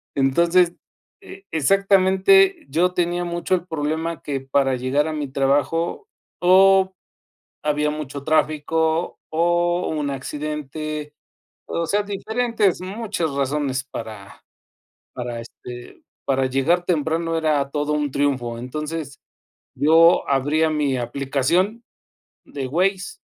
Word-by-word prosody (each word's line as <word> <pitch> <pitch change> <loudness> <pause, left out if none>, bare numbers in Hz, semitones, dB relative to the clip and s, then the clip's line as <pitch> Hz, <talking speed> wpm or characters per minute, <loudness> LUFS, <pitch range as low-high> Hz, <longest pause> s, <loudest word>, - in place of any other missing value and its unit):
Entonces, 170 +6 +3 0.5
eh, 195 - -13
exactamente, 195 - +4
yo 175 +6 +1
tenía 175 0 0
mucho 175 +1 -1
el 175 -1 -4
problema 160 +1 -3
que, 140 -2 -3
para 135 0 +1
llegar 130 +4 0
a 160 - -3
mi 150 -2 -3
trabajo, 145 - 0 0.3
o 190 +1 +5 0.7
había 150 0 +1
mucho 145 -2 -6
tráfico, 160 +1 0
o 175 +2 +1
un 150 -2 -2
accidente, 150 +2 -5 0.5
o 170 - -2
sea, 205 +5 +1
diferentes, 210 0 0
muchas 195 -3 -3
razones 140 -1 -1
para 110 -6 -9 0.7
para, 120 -1 -5
este, 120 +1 -11 0.2
para 135 -1 +1
llegar 135 +7 +1
temprano 165 0 0
era 150 -3 +1
todo 150 +1 -1
un 150 -1 0
triunfo. 130 -4 -1
Entonces, 150 +3 -5 0.6
yo 165 +3 +5
abría 145 +4 +2
mi 150 -3 0
aplicación, 140 - 0 0.6
de 135 -2 -5
Waze, 190 - -1
155 Hz, 110 wpm, -22 LUFS, 140-175 Hz, 0.7 s, o